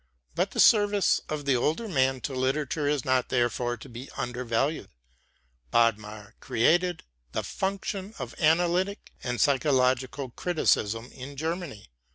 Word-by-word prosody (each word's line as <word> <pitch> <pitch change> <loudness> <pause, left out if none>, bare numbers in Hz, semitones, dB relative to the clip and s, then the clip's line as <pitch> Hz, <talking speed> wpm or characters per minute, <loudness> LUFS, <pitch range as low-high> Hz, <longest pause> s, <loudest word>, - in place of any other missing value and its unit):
But - - 0
the - - -6
service 205 -2 +5
of 150 -2 -4
the 140 -2 +3
older 155 - 0
man 135 -7 +1
to 140 - -4
literature 140 +3 -1
is 145 -3 0
not 130 -1 +1
therefore 120 0 0
to - - -12
be 120 +3 -9
undervalued. 125 +4 -1 0.8
Bodmer 110 - 0
created 175 +8 +1 0.3
the - - -1
function 195 +1 -3
of 125 -4 -6
analytic 175 +5 +1
and 125 -1 -2
psychological 130 -2 +1
criticism 120 - 0
in 135 +2 -9
Germany. 160 - -4
135 Hz, 130 wpm, -27 LUFS, 120-165 Hz, 0.8 s, service